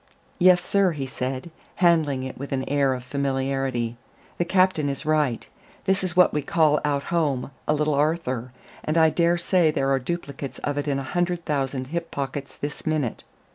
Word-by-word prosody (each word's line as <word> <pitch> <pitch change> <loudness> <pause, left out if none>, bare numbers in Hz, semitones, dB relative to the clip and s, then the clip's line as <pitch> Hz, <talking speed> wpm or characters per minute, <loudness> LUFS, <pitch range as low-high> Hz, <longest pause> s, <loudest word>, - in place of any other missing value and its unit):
"Yes, 180 -1 +5
sir," 195 -3 +3
he 140 -3 -4
said, 130 +4 -4 0.2
handling 160 -7 +3
it 130 - -5
with 140 +2 -7
an 130 -1 -2
air 140 -2 +2
of 125 - -7
familiarity, 135 -3 -1 0.4
"the 175 - +2
captain 185 -5 +2
is 140 +3 -4
right. 150 -6 +1 0.4
This 195 0 +2
is 180 -3 -2
what 180 - +6
we 150 - 0
call 150 +1 +2
out 145 -1 0
home 145 -6 0 0.2
a 150 - +3
Little 150 0 +1
Arthur, 140 -5 0 0.3
and 155 +2 0
I 160 -1 +5
dare 170 +1 +2
say 175 -1 +3
there 135 -2 0
are 135 - +3
duplicates 140 -2 -5
of 145 0 -1
it 145 - -3
in 140 -1 +1
a 135 - -3
hundred 175 +3 -1
thousand 135 -3 -2
hip 170 -1 -2
pockets 140 0 -5
this 145 +1 -5
minute. 150 -7 -1
145 Hz, 185 wpm, -24 LUFS, 135-170 Hz, 0.4 s, what